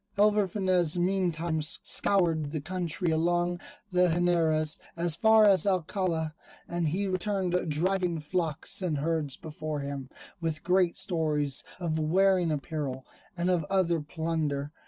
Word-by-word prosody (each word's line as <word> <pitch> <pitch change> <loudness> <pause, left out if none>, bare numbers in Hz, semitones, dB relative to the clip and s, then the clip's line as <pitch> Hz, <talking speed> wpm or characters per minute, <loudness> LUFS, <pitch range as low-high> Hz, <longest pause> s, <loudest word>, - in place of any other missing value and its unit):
Alvar 210 -1 +4
Fanez 185 -3 +1
meantime 175 -3 0
scoured 165 0 +1
the 155 +1 -3
country 175 +1 -2
along 175 +2 +1 0.3
the 180 0 +4
Henares 165 -2 +2 0.2
as 170 -2 +1
far 220 +3 +5
as 200 0 +5
Alcala, 175 -3 0 0.3
and 175 -1 -1
he 185 +7 0
returned 185 -2 -1
driving 180 +2 0
flocks 160 +2 -2
and 170 -5 -1
herds 150 -2 -1
before 155 -1 -5
him, 140 -2 -5 0.3
with 160 -2 -3
great 180 -1 +2
stores 150 -5 0 0.2
of 160 -3 -1
wearing 180 +2 +3
apparel, 140 -3 -4 0.3
and 175 +1 0
of 175 -3 +1
other 170 -2 +1
plunder. 150 -2 -2
170 Hz, 130 wpm, -28 LUFS, 155-185 Hz, 0.3 s, far